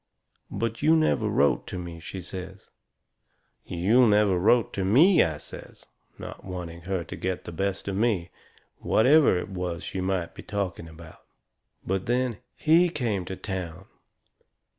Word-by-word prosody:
"But 115 0 -3
you 155 +2 +5
never 140 -9 +2
wrote 70 -8 +2
to - - -5
me," 85 -2 -7
she 95 +3 -7
says. 95 +2 -9 1.0
"You 105 +9 +3
never 105 -3 +3
wrote 115 +5 +3
to 95 - -2
me," 145 - +5
I 80 -2 0
says, - - -12 0.3
not - - -9
wanting 90 -2 -7
her 95 -3 -1
to - - -8
get 95 -1 -3
the - - -6
best 95 +4 -3
of 100 - -2
me, 100 -5 0 0.5
whatever 135 - +4
it 90 - -4
was 90 -3 -4
she 95 - -4
might 90 -2 -2
be - - -10
talking 95 -5 -4
about. 80 0 -14 0.7
"And 95 0 -1
then 125 -2 0 0.2
HE 165 +3 +4
came 115 - -2
to 95 - -5
town! 95 -4 -6
95 Hz, 155 wpm, -26 LUFS, 90-115 Hz, 1.0 s, you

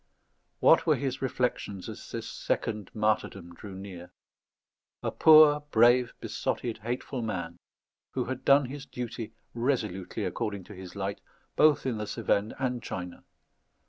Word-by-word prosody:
What - - +6
were - - +5
his 135 -2 -3
reflections 125 -7 -2
as - - -8
this - - -4
second 105 -2 -2
martyrdom 105 -5 -1
drew 95 +2 -10
near? 95 -2 -9 0.9
A - - -1
poor, 155 -2 +7
brave, 120 0 +4
besotted, 115 -2 -3
hateful 120 +3 -4
man, 90 -6 -4 0.5
who - - -1
had 130 0 -5
done 140 0 +5
his 135 +2 -7
duty 115 -2 -5 0.2
resolutely 115 -7 -1
according 100 -3 -3
to 105 - -12
his 95 -1 -10
light 100 0 -3 0.3
both 150 -3 +4
in 120 -5 -1
the 105 - -3
Cevennes 105 -1 0
and 125 -2 -1
China. 90 -5 -6
110 Hz, 140 wpm, -29 LUFS, 100-130 Hz, 0.9 s, poor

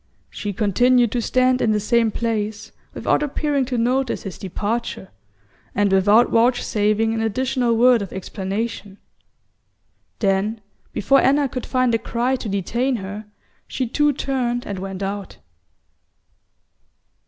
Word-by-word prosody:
She 205 - -4
continued 235 +4 +3
to 245 - -1
stand 255 +2 +2
in 215 - +2
the 210 - +1
same 230 +2 +2
place, 215 -2 -3 0.2
without - - +1
appearing 290 -1 0
to 250 -1 -3
notice 255 +2 0
his 195 -3 -7
departure, 205 +1 -4 0.6
and 205 0 +2
without 205 +5 +4
vouchsafing 225 -2 +2
an 225 - -1
additional 240 +1 0
word 245 -1 +5
of 195 - -6
explanation; 195 +2 -4 1.2
then, 200 +2 0 0.3
before 275 +6 +3
Anna 280 +1 +3
could 255 -1 -6
find 255 -2 +1
a 225 - +2
cry 245 +4 -1
to 225 - -6
detain 235 +7 -1
her, 205 0 -6 0.4
she 260 - -2
too 295 +5 +2
turned 250 -3 -2
and 200 -2 -5
went 195 0 -5
out. 200 0 -5
230 Hz, 130 wpm, -21 LUFS, 205-250 Hz, 1.2 s, word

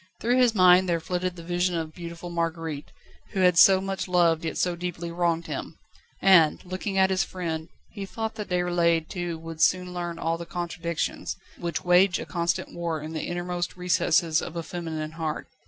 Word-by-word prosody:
Through 240 +2 +2
his 245 -3 +4
mind 185 -1 +6
there 170 -1 +1
flitted 180 +2 -2
the 170 - -10
vision 175 +1 0
of 160 -1 -4
beautiful 170 0 -8
Marguerite, 165 -3 -3 0.4
who 190 - 0
had 180 -2 +5
so 190 -1 +8
much 195 0 -3
loved 170 -3 +3
yet 160 - -3
so 180 -1 +1
deeply 170 -1 -5
wronged 170 -1 0
him, - - -6 0.5
and, 175 -5 +6
looking 185 +2 -4
at 190 0 +4
his 190 0 +2
friend, 165 -3 -4 0.2
he 200 -2 -6
thought 220 +2 -4
that 210 - -6
Déroulède 175 -2 +1
too 175 -2 -4
would 165 0 -8
soon 180 0 +2
learn 175 -1 -4
all 165 0 -1
the 170 - -6
contradictions, 170 -1 -3 0.2
which 170 -1 -4
wage 180 +2 +5
a - - -6
constant 170 -1 -2
war 170 -2 -2
in 155 +2 -7
the 155 - -3
innermost 175 0 -3
recesses 170 -2 +2
of 170 - -7
a 170 - -3
feminine 160 -3 -5
heart. 160 -2 -4
175 Hz, 190 wpm, -26 LUFS, 165-180 Hz, 0.5 s, so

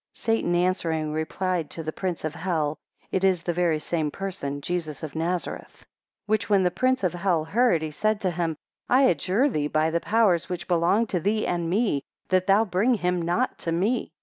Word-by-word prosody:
15 - - -20 0.2
Satan 175 -5 0
answering, 165 -4 0
replied 165 +1 -2
to 165 - -6
the 155 0 -4
prince 180 -4 -3
of 155 - -2
hell, 160 -4 -1 0.3
It 190 - 0
is 185 -3 +2
the 175 - -1
very 170 -2 +2
same 155 0 -1
person, 145 -6 -4
Jesus 155 -2 -4
of 155 -1 -6
Nazareth. 170 +2 -4 0.4
16 - - -65
Which 215 0 0
when 200 -2 +4
the 180 - +2
prince 255 +5 +1
of 180 - +1
hell 175 -3 0
heard, 205 -2 +2
he 155 - -3
said 215 +7 0
to 185 - 0
him, 165 -2 -2 0.3
I 260 +2 +5
adjure 195 - +2
thee 150 - -1
by 155 +1 +1
the 170 - +1
powers 205 -5 +2
which 180 -1 -4
belong 180 +6 +3
to 190 -5 -1
thee 210 +5 0
and 170 -1 -1
me, 195 - +1 0.3
that 185 0 +2
thou 200 +3 +5
bring 210 +6 +2
him 180 -3 0
not 175 +10 -1
to 165 - -3
me. 200 +8 0
175 Hz, 205 wpm, -25 LUFS, 160-195 Hz, 0.4 s, I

